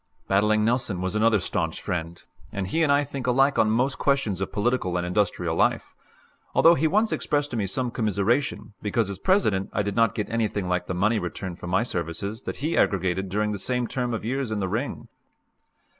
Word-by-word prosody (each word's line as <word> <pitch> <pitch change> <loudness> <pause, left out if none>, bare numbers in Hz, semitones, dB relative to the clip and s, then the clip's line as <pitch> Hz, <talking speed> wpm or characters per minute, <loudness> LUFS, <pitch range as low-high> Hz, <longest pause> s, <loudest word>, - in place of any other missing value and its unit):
Battling 105 +2 +3
Nelson 115 -5 0
was 95 +1 -2
another 110 0 +3
stanch - - -2
friend, 85 -1 -4 0.3
and 100 -2 -3
he 165 - 0
and 155 -3 +3
I 145 +1 +4
think 135 -3 -5
alike 135 +3 +3
on 110 - +4
most 125 +5 +1
questions 125 -10 +1
of 95 - -2
political 105 -5 0
and 90 - -1
industrial 90 -3 0
life; - - +1 0.6
although 165 - +7
he 160 -1 +2
once 215 +6 +2
expressed 145 0 0
to - - -3
me 100 -3 0
some 125 +5 -2
commiseration 110 +3 0
because, 105 0 0
as 95 - -7
President, 110 - +2
I 105 - +1
did 100 0 -3
not 115 -3 +3
get 105 - -2
anything 110 -4 -1
like 90 0 -1
the 90 - -3
money 110 +5 +2
return 90 0 -5
for 90 - -9
my 90 +6 +2
services 100 +2 -3
that - - -2
he 165 - 0
aggregated 95 -1 +1
during 105 +2 0
the 100 - -3
same 125 +4 -1
term 125 0 -2
of 115 -2 -3
years 130 +1 -1
in 110 -1 -2
the 95 - -1
ring. 115 +9 -3
110 Hz, 205 wpm, -25 LUFS, 95-125 Hz, 0.6 s, although